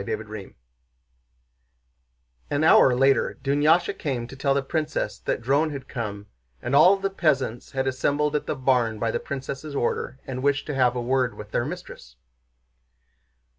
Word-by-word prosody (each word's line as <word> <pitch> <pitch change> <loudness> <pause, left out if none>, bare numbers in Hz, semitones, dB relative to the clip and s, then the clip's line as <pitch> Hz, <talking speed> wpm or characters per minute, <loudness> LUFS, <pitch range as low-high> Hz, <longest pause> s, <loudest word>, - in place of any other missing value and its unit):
CHAPTER 110 - -4
XI 100 -3 -10 1.9
An 145 +1 0
hour 130 -5 +6
later 135 +2 +2
Dunyásha 145 +5 +2
came 130 -6 -2
to 130 - -11
tell 135 0 +1
the 140 - 0
princess 155 +2 -2
that 120 - -3
Dron 140 +5 +2
had 140 -3 -7
come, 105 -4 -5 0.3
and 130 - -2
all 180 +7 +7
the 195 0 -2
peasants 135 -10 -1
had 135 -1 -1
assembled 145 +3 0
at 150 - -2
the - - -1
barn 125 -4 +1
by 115 +1 -1
the - - -1
princess' 140 +2 -6
order 130 0 -2
and 130 -1 -5
wished 140 +1 +1
to 150 - -4
have 125 -2 +2
word 125 -1 0
with 105 0 -10
their 120 - 0
mistress. 150 - -9
135 Hz, 160 wpm, -25 LUFS, 125-145 Hz, 1.9 s, all